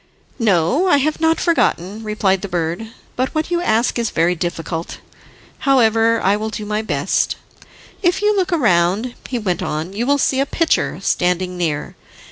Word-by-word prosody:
"No, 220 - +2
I 290 - +5
have 305 +3 -1
not 325 0 +3
forgotten," 215 - 0
replied 210 -3 0
the 200 - -4
bird, 175 +4 -2 0.3
"but 255 +5 -2
what 315 +2 -1
you 345 0 +1
ask 235 -5 +1
is 230 -2 0
very 170 +2 +2
difficult. 165 -1 -4 0.6
However, 230 -4 +3
I 195 +2 +3
will 215 +1 -3
do 215 -1 -6
my 210 +1 -1
best. 220 - 0 0.7
If 355 -2 +2
you 420 0 +3
look 380 -3 +1
round," 215 - +2 0.2
he 250 - -2
went 190 -6 -2
on, 155 +5 -3
"you 235 +5 -2
will 285 0 +3
see 265 -1 +1
a 275 - +1
pitcher 330 +2 0
standing 180 +1 0
near. 160 -5 -2
220 Hz, 170 wpm, -19 LUFS, 180-275 Hz, 0.7 s, I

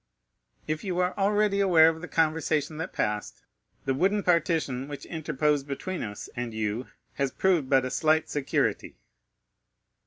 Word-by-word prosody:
"If 155 0 -3
you 185 -3 -2
are 180 0 +1
already 205 0 +2
aware 175 -5 +6
of 160 0 0
the 180 - -6
conversation 155 -1 0
that 165 - -4
passed, 105 0 -3 0.4
the 135 - +1
wooden 195 +8 +1
partition 160 -7 +1
which 145 -1 -7
interposed 150 -3 -1
between 175 +6 -4
us 105 -1 -6
and 120 -2 -4
you 110 +3 -2 0.3
has 140 -1 +1
proved 170 -2 +1
but 135 -2 +4
a 130 - -3
slight 155 0 +2
security." 145 -2 -1
155 Hz, 150 wpm, -27 LUFS, 135-180 Hz, 0.4 s, aware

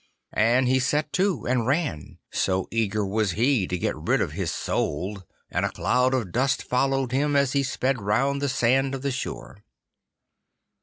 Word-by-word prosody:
And 120 +4 +3
he 130 +1 +3
set 150 +3 0
to 185 - +1
and 120 -2 +1
ran, 140 - -1
so 95 0 0
eager 105 -2 0
was 100 -1 0
he 120 -4 +2
to 90 - -2
get - - -1
rid - - 0
of - - -1
his - - -2
soul, 95 +7 -2 0.3
and - - 0
a - - +1
cloud 125 +1 +1
of 110 -9 -2
dust 130 +5 +1
followed 135 0 0
him 145 +2 +1
as 140 -2 +3
he 140 - +2
sped 130 -1 -1
round 130 +8 +1
the 140 - 0
sand 130 +2 +2
of 135 - -7
the 140 - 0
shore. 125 -4 -6
125 Hz, 175 wpm, -25 LUFS, 105-135 Hz, 0.3 s, And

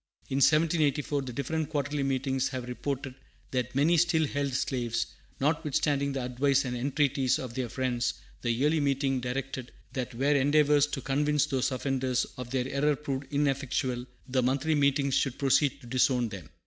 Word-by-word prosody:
In 135 - -1
1784, 150 -1 +3
the 130 -2 -6
different 150 +4 -2
Quarterly 145 -1 -1
Meetings 135 -1 0
having 125 -1 -5
reported 135 +1 -4 0.4
that 125 0 -2
many 155 +5 +4
still 165 -1 +3
held 140 -1 -2
slaves, 125 -3 -1 0.3
notwithstanding 145 -1 +1
the 135 -2 -2
advice 135 +2 +2
and 125 -1 -3
entreaties 135 0 +1
of 125 -3 -6
their 125 -1 -3
friends, 120 -1 -1 0.3
the 120 - -2
Yearly 145 +7 +2
Meeting 135 -2 +1
directed 130 0 -4 0.2
that 125 -3 -4
where 140 +4 +2
endeavors 145 +1 +4
to 140 - -4
convince 150 +2 +1
those 135 -2 0
offenders 130 -1 0
of 125 -1 -6
their 130 0 -1
error 145 +2 +1
proved 135 -1 -5
ineffectual, 135 -3 0 0.2
the 130 0 +1
Monthly 135 +5 +1
Meetings 140 -1 +2
should 130 -1 +1
proceed 140 0 +2
to - - -13
disown 125 -1 +2
them. 95 -6 -9
135 Hz, 160 wpm, -29 LUFS, 130-145 Hz, 0.4 s, many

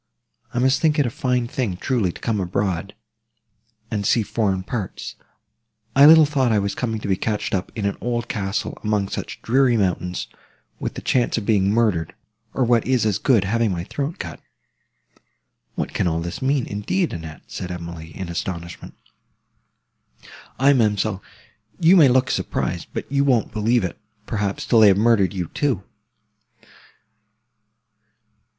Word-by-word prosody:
I - - -6
must 130 +2 +2
think 155 -1 +3
it 145 - +3
a 120 - -2
fine 125 -1 0
thing, 115 -7 -2
truly, 110 -4 0
to - - -12
come 110 -3 -1
abroad, 95 +1 -2 1.0
and 105 -2 -1
see 110 +3 +2
foreign 100 -4 -1
parts! 100 -1 -5 0.8
I 140 +2 +8
little 160 0 +9
thought 135 -4 +1
I 110 - +3
was 100 0 0
coming 115 -3 -2
to - - -5
be 95 - +2
catched 105 +2 -2
up 95 -2 -2
in 105 -3 -3
an 100 - -1
old 120 -1 -2
castle, 105 +1 -3
among 105 -2 0
such - - -6
dreary 125 0 +3
mountains, 90 -2 -1 0.5
with - - -4
the - - -7
chance 125 -2 +1
of 110 - -3
being 100 -3 +2
murdered, 105 -8 +1 0.4
or, 130 - +2
what 120 -1 +2
is 130 -3 +2
as 105 -4 +1
good, 120 -8 +3
having 110 +2 +1
my 85 -2 -3
throat 145 - -4
cut!" 80 -2 -7 1.3
"What - - -3
can - - 0
all 80 -1 0
this 85 +1 -5
mean, 135 -1 +1
indeed, 135 - -1
Annette?" 80 -3 -8
said 90 - -6
Emily, 85 -2 -7
in 95 -2 -5
astonishment. 85 0 -6 1.6
"Aye, 140 +2 +5
ma'amselle, 105 -4 +1 0.6
you 170 +3 +6
may 160 -6 +7
look 130 +1 +3
surprised; - - -2
but - - -4
you 140 0 +2
won't 125 -5 +2
believe 115 +1 +2
it, 90 - -4 0.3
perhaps, 100 -2 -2
till 115 - +4
they 110 - +8
have 95 -1 +5
murdered 105 -3 +3
you, 90 -5 -4
too. 130 -10 -1
110 Hz, 160 wpm, -22 LUFS, 95-125 Hz, 1.6 s, little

